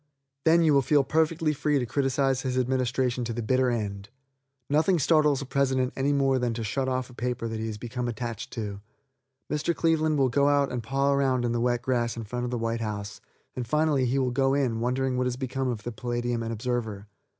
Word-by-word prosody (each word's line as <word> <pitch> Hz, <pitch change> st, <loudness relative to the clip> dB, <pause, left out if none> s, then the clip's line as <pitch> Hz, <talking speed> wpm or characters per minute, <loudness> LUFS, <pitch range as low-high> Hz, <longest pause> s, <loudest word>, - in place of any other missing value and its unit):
Then 165 Hz, +1 st, +5 dB
you 155 Hz, -2 st, +4 dB
will 140 Hz, -, +5 dB
feel 145 Hz, +1 st, +3 dB
perfectly 160 Hz, +1 st, +1 dB
free 150 Hz, 0 st, +1 dB
to 125 Hz, -, 0 dB
criticise 135 Hz, +1 st, +1 dB
his 130 Hz, -1 st, -2 dB
administration 125 Hz, -1 st, 0 dB
to 115 Hz, -, -3 dB
the 120 Hz, 0 st, -3 dB
bitter 130 Hz, +2 st, +2 dB
end. 100 Hz, -4 st, -3 dB, 0.6 s
Nothing 160 Hz, +6 st, +3 dB
startles 150 Hz, -2 st, +3 dB
a -, -, -7 dB
president 130 Hz, -1 st, +1 dB
any 135 Hz, +2 st, +1 dB
more 135 Hz, -2 st, +2 dB
than 120 Hz, -2 st, -1 dB
to 115 Hz, -, -3 dB
shut 130 Hz, +5 st, -1 dB
off 130 Hz, 0 st, -2 dB
a -, -, -14 dB
paper 120 Hz, -1 st, -3 dB
that 110 Hz, -1 st, -4 dB
he 110 Hz, -, -3 dB
has 110 Hz, -2 st, -5 dB
become 120 Hz, +2 st, -4 dB
attached 115 Hz, -1 st, -4 dB
to. 105 Hz, -4 st, -5 dB, 0.7 s
Mr. 150 Hz, +3 st, -1 dB
Cleveland 155 Hz, -2 st, +2 dB
will 135 Hz, -2 st, +3 dB
go 140 Hz, +3 st, +3 dB
out 145 Hz, -1 st, +2 dB
and 125 Hz, -1 st, -2 dB
paw 135 Hz, +3 st, +1 dB
around 130 Hz, -3 st, +1 dB
in 120 Hz, -, 0 dB
the 120 Hz, 0 st, 0 dB
wet 120 Hz, 0 st, +1 dB
grass 120 Hz, -2 st, 0 dB
in 115 Hz, -, -4 dB
front 120 Hz, +3 st, -4 dB
of -, -, -3 dB
the 125 Hz, -, -2 dB
white 115 Hz, 0 st, -2 dB
house, 105 Hz, -2 st, -5 dB, 0.3 s
and 125 Hz, -2 st, -4 dB
finally 150 Hz, -2 st, +2 dB
he 130 Hz, +3 st, 0 dB
will 130 Hz, -2 st, +1 dB
go 135 Hz, +1 st, +2 dB
in, 125 Hz, -5 st, 0 dB
wondering 125 Hz, +2 st, 0 dB
what 125 Hz, 0 st, +1 dB
has 125 Hz, 0 st, -2 dB
become 130 Hz, 0 st, -2 dB
of 115 Hz, -4 st, -3 dB
the 120 Hz, -, -4 dB
Palladium 120 Hz, +1 st, -2 dB
and 115 Hz, 0 st, -3 dB
Observer. 110 Hz, -3 st, -3 dB
125 Hz, 225 wpm, -27 LUFS, 120-140 Hz, 0.7 s, Then